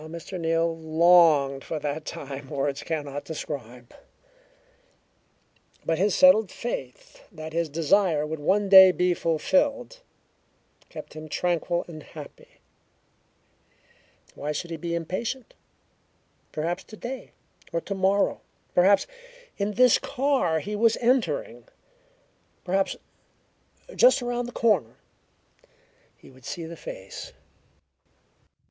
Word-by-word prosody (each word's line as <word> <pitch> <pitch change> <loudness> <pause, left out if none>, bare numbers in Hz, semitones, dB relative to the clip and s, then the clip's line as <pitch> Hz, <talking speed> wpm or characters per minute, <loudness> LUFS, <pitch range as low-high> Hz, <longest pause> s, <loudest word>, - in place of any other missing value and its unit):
How 155 - -10
Mr. 170 +3 -7
Neal 165 0 +1
longed 160 -4 +4
for 160 - -4
that 150 +1 -4
time 140 -4 -7
words 140 0 -2
cannot 145 -3 -4
describe, 125 -6 -7 1.9
but 165 0 0
his 200 +1 +2
settled 245 -8 +6
faith 135 - -7
that 155 0 -9
his 165 -1 -1
desire 165 +1 +2
would 155 0 -5
one 195 +7 +1
day 190 -1 +10
be 180 0 +1
fulfilled 190 - 0 0.9
kept - - -10
him 155 0 -9
tranquil 175 +1 -1
and 155 -3 -9
happy. - - -13 1.7
Why 150 +1 -4
should 170 +3 -5
he 165 - -4
be 170 +1 -3
impatient? 220 +9 -4 1.0
Perhaps 170 +4 -3
today, 240 +4 -8 0.4
or 170 - 0
tomorrow 195 +2 0 0.3
perhaps 190 +3 +4 0.5
in 200 +1 -1
this 250 +1 +5
car 255 - 0
he 210 +5 -5
was 225 +1 +3
entering, 260 - 0 1.0
perhaps 190 +1 0 1.0
just - - +5
around 245 0 -2
the - - -6
next - - -9
corner 190 - +2 1.2
he - - -17
would 130 -1 -19
see 170 - -5
the 165 +1 -8
face. 95 -10 -9
170 Hz, 115 wpm, -26 LUFS, 155-205 Hz, 1.9 s, day